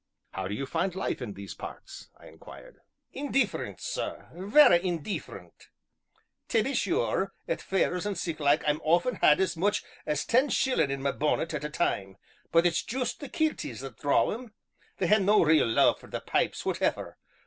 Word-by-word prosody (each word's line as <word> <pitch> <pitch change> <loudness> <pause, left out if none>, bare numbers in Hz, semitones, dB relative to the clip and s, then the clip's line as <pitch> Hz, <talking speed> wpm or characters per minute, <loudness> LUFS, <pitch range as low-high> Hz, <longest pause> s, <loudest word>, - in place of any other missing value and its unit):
"How 95 -1 -4
do 100 - -3
you 135 - -3
find 170 +5 -2
life 190 - -2
in 110 -5 -5
these 100 0 -8
parts?" - - -10
I - - -17
inquired. - - -14 0.3
"Indeefferent, 275 -1 -1
sir - - -5
vera 195 +1 +5
indeefferent! 175 +1 -5 0.8
Tae 225 - +2
be 270 - -2
sure, - - 0
at - - -2
fairs 190 0 0
an' 205 - -2
sic 165 -2 -4
like 145 +1 +2
I've 150 +1 +1
often 175 +8 +2
had 150 - +5
as 190 -2 +1
much 200 +5 0 0.2
as 150 -1 -1
ten 260 +5 +3
shillin' 255 - +1
in 135 0 -3
'ma 140 - +1
bonnet 155 +2 -1
at 150 -1 -3
a 150 - -3
time; 100 - -2 0.3
but 165 +1 +4
it's 170 -1 +2
juist 250 +1 -3
the 285 - -8
kilties 310 - -2
that 135 -5 -9
draw 145 - +2
em; 230 -1 -7 0.4
they 185 - 0
hae 210 +4 +5
no 205 +1 +4
real 155 -4 +4
love 115 - +3
for - - -14
the - - -4
pipes, - - -1
whateffer! - - -2
175 Hz, 180 wpm, -28 LUFS, 150-215 Hz, 0.8 s, vera